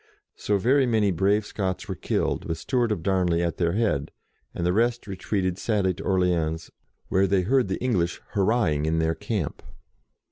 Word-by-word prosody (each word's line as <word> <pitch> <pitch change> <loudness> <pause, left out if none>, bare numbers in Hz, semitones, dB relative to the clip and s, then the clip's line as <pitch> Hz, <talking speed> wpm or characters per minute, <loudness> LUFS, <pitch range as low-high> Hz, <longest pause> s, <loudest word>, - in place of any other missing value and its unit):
So 105 - 0
very 130 +6 +3
many 110 -4 +2
brave 100 +4 +2
Scots 95 0 -3
were 95 - -2
killed, - - -1
with 80 - -3
Stewart 120 - 0
of 85 -6 -2
Darnley 90 -3 +1
at 85 - -2
their 85 -1 +1
head, 95 -11 0 0.4
and 85 - -3
the 90 - +2
rest 120 +2 +1
retreated 95 -1 -2
sadly 100 -5 +1
to 95 - -9
Orleans, 85 -4 0 0.4
where 95 +1 +3
they 95 -1 +2
heard 125 +4 +2
the 95 - -2
English 95 -9 0
hurrahing 95 -8 +1
in 80 +1 +1
their 80 0 +1
camp. 105 -4 -3
95 Hz, 175 wpm, -25 LUFS, 85-105 Hz, 0.4 s, very